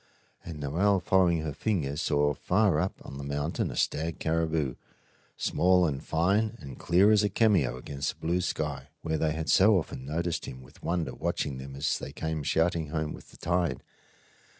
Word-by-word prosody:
And 80 Hz, -3 st, -7 dB
Noel, 90 Hz, +8 st, +2 dB
following 90 Hz, -3 st, +3 dB
her 75 Hz, -2 st, -3 dB
finger, 80 Hz, -7 st, -1 dB
saw 75 Hz, -1 st, +1 dB
far 90 Hz, +1 st, +2 dB
up 90 Hz, +4 st, 0 dB
on 70 Hz, -, -8 dB
the -, -, -5 dB
mountain 70 Hz, +3 st, -2 dB
a -, -, -6 dB
stag 80 Hz, +1 st, -1 dB
caribou, 80 Hz, -4 st, 0 dB, 0.6 s
small 90 Hz, 0 st, +3 dB
and 70 Hz, -4 st, -2 dB
fine 100 Hz, +7 st, +1 dB
and 70 Hz, -5 st, -10 dB
clear 95 Hz, +5 st, +4 dB
as 105 Hz, -1 st, +5 dB
a 105 Hz, -, +2 dB
cameo 100 Hz, -, +2 dB
against 70 Hz, +2 st, -4 dB
the -, -, -10 dB
blue 90 Hz, +2 st, +2 dB
sky, 70 Hz, -6 st, -3 dB, 0.2 s
where 80 Hz, -1 st, -1 dB
they 75 Hz, -1 st, +1 dB
had 80 Hz, 0 st, -4 dB
so 95 Hz, +7 st, +6 dB
often 75 Hz, -6 st, -4 dB
noticed 85 Hz, +4 st, -2 dB
him 65 Hz, 0 st, -8 dB
with 65 Hz, -, -18 dB
wonder 85 Hz, -6 st, -1 dB
watching 65 Hz, +2 st, -2 dB
them 70 Hz, +1 st, -8 dB
as 70 Hz, +2 st, 0 dB
they -, -, -7 dB
came 80 Hz, -1 st, -3 dB
shouting 80 Hz, +2 st, +1 dB
home 80 Hz, 0 st, -2 dB
with -, -, -12 dB
the -, -, -16 dB
tide. 85 Hz, -4 st, -1 dB
80 Hz, 185 wpm, -28 LUFS, 70-90 Hz, 0.6 s, so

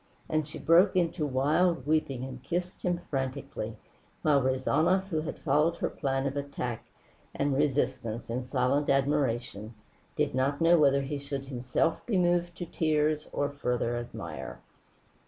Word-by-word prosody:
And 155 Hz, -1 st, 0 dB
she 155 Hz, +1 st, -8 dB
broke 180 Hz, +4 st, +5 dB
into 170 Hz, -3 st, +1 dB
wild 145 Hz, +3 st, +2 dB
weeping 145 Hz, -4 st, 0 dB
and 130 Hz, -1 st, -7 dB
kissed 175 Hz, +4 st, -3 dB
him 175 Hz, -1 st, 0 dB
frantically, 135 Hz, 0 st, -3 dB, 0.5 s
while 145 Hz, -2 st, +4 dB
Rezanov 160 Hz, +9 st, +2 dB
who 160 Hz, -4 st, 0 dB
had 160 Hz, -, -5 dB
followed 150 Hz, +3 st, +2 dB
her -, -, -2 dB
plan 135 Hz, -2 st, -1 dB
of 135 Hz, 0 st, -2 dB
attack 140 Hz, -5 st, -4 dB, 0.5 s
and 140 Hz, 0 st, +1 dB
resistance 130 Hz, -5 st, 0 dB
in 125 Hz, +2 st, -2 dB
silent 130 Hz, +3 st, +1 dB
admiration, 130 Hz, -6 st, 0 dB, 0.4 s
did -, -, 0 dB
not 135 Hz, +2 st, +1 dB
know 170 Hz, 0 st, +5 dB
whether 140 Hz, -2 st, +4 dB
he 140 Hz, +1 st, -3 dB
should 140 Hz, -1 st, -5 dB
himself 130 Hz, +4 st, -1 dB
be 215 Hz, -5 st, +1 dB
moved 175 Hz, -1 st, +1 dB
to 175 Hz, -, -4 dB
tears 155 Hz, -2 st, 0 dB
or 145 Hz, 0 st, -1 dB
further 125 Hz, -4 st, -1 dB
admire. 120 Hz, 0 st, -6 dB
145 Hz, 150 wpm, -29 LUFS, 130-160 Hz, 0.5 s, broke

